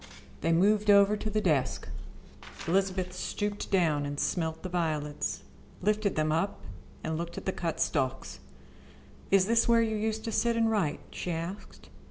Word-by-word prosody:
They 165 - +1
moved 205 +5 +3
over 200 +1 +6
to 215 +1 -4
the 215 0 0
desk. 155 -9 0 0.8
Elizabeth 185 0 0
stooped 205 +2 -3
down 160 -7 +2
and 145 0 -4
smelt 160 -2 -1
the - - -3
violets, 155 -4 -2 0.4
lifted 210 +1 +1
them 155 0 +1
up 165 +6 0 0.4
and 160 0 -2
looked 170 0 -5
at - - -6
the 190 - +1
cut 165 -3 -3
stalks. 130 - -1 0.9
"Is 195 -1 +5
this 230 +2 +3
where 230 -1 +5
you 220 -1 -1
used 220 +1 -2
to 225 - -3
sit 235 +1 +1
and 225 -1 +3
write?" 190 -9 0
she - - -5
asked. 165 - -6
185 Hz, 165 wpm, -29 LUFS, 160-210 Hz, 0.9 s, over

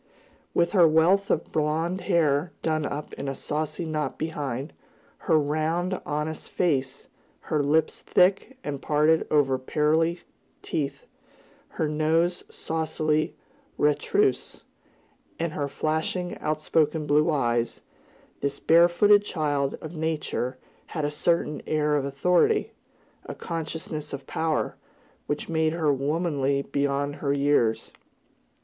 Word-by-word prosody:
With 170 0 +3
her 180 -5 +6
wealth 175 +6 +3
of - - 0
blond 160 +4 0
hair 160 -3 +2
done 155 -2 0
up 145 +1 -6
in 140 - -5
a 135 - -2
saucy 155 +4 -3
knot 155 -3 -2
behind; 145 -3 -4 0.6
her 160 - +6
round, 160 +5 0
honest 150 +1 -3
face; 135 -6 -1 0.4
her 155 -2 +3
lips 155 +2 +1
thick, 195 +8 +2
and 140 -2 -4
parted 155 +2 +2
over 135 -3 +2
pearly 160 +5 +1 0.4
teeth; 145 -3 -3 0.7
her 160 - +1
nose 160 +3 +1
saucily 155 -1 -1 0.4
retrousse; 150 - +1 0.7
and 165 -1 -2
her 145 -2 -2
flashing, 160 +5 -2
outspoken 155 0 0
blue 150 +3 +3
eyes, 120 -6 0 0.6
this 140 0 -2
barefooted 175 +5 +5
child 145 -7 -1
of 160 +2 -8
Nature 155 -5 -2 0.3
had 155 -3 -3
a 145 - -1
certain 150 0 0
air 150 -1 +1
of 140 -2 0
authority, 180 - +2 0.6
a - - -6
consciousness 160 -2 -5
of 140 -1 -6
power, 160 -1 -1 0.5
which 145 - -2
made 160 -1 +1
her 155 -4 +2
womanly 140 -1 0
beyond 140 +1 -1
her 140 -1 0
years. 140 -5 +1
155 Hz, 120 wpm, -26 LUFS, 145-165 Hz, 0.7 s, her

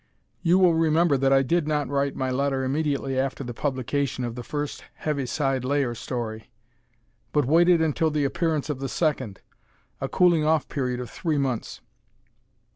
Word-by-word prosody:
You 175 +1 +4
will 180 -3 +5
remember 160 -1 +3
that 135 0 +2
I 135 0 +5
did 165 +3 +1
not 150 -2 0
write 140 0 -1
my 130 -1 -1
letter 135 0 0
immediately 140 -1 -1
after 135 +1 -2
the 120 -1 -6
publication 130 0 -2
of 120 -1 -3
the 125 - -6
first 145 +3 -4
Heaviside 135 -2 -1
Layer 135 -2 0
story, 115 -1 -5 0.8
but 150 -3 +2
waited 170 +3 +4
until 160 +1 +1
the 150 -2 0
appearance 155 +1 0
of 150 -4 -3
the 135 0 -3
second, 130 - -1 0.6
a - - -2
"cooling 175 -4 +4
off" 155 -1 +2
period 125 -3 -2
of 125 -2 -6
three 160 -4 -1
months. 130 -5 -2
140 Hz, 165 wpm, -25 LUFS, 130-155 Hz, 0.8 s, will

